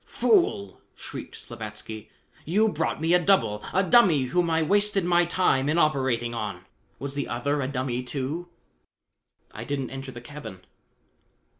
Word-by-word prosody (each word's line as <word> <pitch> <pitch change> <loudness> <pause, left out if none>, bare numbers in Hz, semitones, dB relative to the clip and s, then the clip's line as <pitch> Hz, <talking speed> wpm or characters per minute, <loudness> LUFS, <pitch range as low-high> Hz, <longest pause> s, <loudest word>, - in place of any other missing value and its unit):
"Fool!" 225 - +1
shrieked - - -8
Slavatsky. 110 -1 -8 0.3
"You 210 +7 +2
brought 160 -3 -2
me 165 +2 +1
a 180 - +6
double, 175 - +2
a 190 - +2
dummy 185 - +5
whom 170 +7 0
I 160 0 +2
wasted 205 +2 +2
my 175 0 +3
time 160 -6 +2
in 155 - +1
operating 130 -7 +1
on. 100 -5 -5 0.3
Was 140 0 -6
the 140 -2 -3
other 145 +6 -1
a 130 - -1
dummy, 130 -2 -2
too?" 135 +7 -4 1.0
"I - - -7
didn't 140 -3 -3
enter 135 0 -7
the 120 - -9
cabin." 120 -8 -10
140 Hz, 150 wpm, -26 LUFS, 120-175 Hz, 1.0 s, a